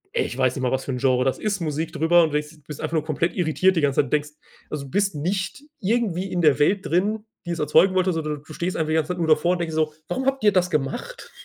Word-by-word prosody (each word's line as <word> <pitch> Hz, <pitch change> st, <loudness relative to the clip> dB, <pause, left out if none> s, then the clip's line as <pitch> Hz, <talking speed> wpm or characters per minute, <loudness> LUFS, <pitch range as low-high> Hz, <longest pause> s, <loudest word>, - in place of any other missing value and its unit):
Ich 120 Hz, -, -1 dB
weiß 130 Hz, -1 st, +2 dB
nicht 135 Hz, -, -4 dB
mal, 125 Hz, -, +1 dB
was 130 Hz, 0 st, -1 dB
für -, -, -3 dB
'n 125 Hz, -, -2 dB
Genre 125 Hz, -1 st, +2 dB
das 130 Hz, 0 st, 0 dB
ist, 205 Hz, -3 st, -2 dB
Musik 155 Hz, 0 st, -3 dB
drüber 170 Hz, +2 st, +4 dB
und 160 Hz, -, +1 dB
du -, -, -9 dB
denkst 150 Hz, +1 st, -10 dB
bist 150 Hz, -, -7 dB
einfach 160 Hz, 0 st, -3 dB
nur 155 Hz, -2 st, +1 dB
komplett 165 Hz, +2 st, -1 dB
irritiert 180 Hz, +2 st, +2 dB
die -, -, +3 dB
ganze 140 Hz, -2 st, +3 dB
Zeit. 135 Hz, -, -7 dB
Denkst 150 Hz, 0 st, 0 dB, 0.4 s
also 140 Hz, -2 st, -5 dB
bist 195 Hz, +1 st, 0 dB
nicht 190 Hz, -, -3 dB, 0.2 s
irgendwie 195 Hz, -3 st, 0 dB
in 175 Hz, -, 0 dB
der 150 Hz, -4 st, +4 dB
Welt 190 Hz, +7 st, +2 dB
drin, 210 Hz, +5 st, 0 dB, 0.2 s
die 175 Hz, -, -3 dB
es 170 Hz, -, -3 dB
erzeugen 180 Hz, +5 st, +4 dB
wollte, 185 Hz, 0 st, +2 dB
sondern 155 Hz, -3 st, -3 dB
du 155 Hz, -, -11 dB
stehst 175 Hz, +4 st, -3 dB
einfach 155 Hz, -1 st, -1 dB
die 155 Hz, -, +1 dB
ganze 160 Hz, -1 st, 0 dB
Zeit 180 Hz, -, -8 dB
nur 165 Hz, -, 0 dB
davor 160 Hz, +3 st, +3 dB
und 180 Hz, -, -2 dB
denkst 165 Hz, -2 st, -3 dB
so: 155 Hz, -1 st, 0 dB, 0.2 s
„Warum 260 Hz, 0 st, -2 dB
habt 270 Hz, -2 st, 0 dB
ihr 210 Hz, -, +6 dB
das 180 Hz, -2 st, +2 dB
gemacht?” 165 Hz, -, -3 dB
165 Hz, 280 wpm, -23 LUFS, 150-185 Hz, 0.4 s, ihr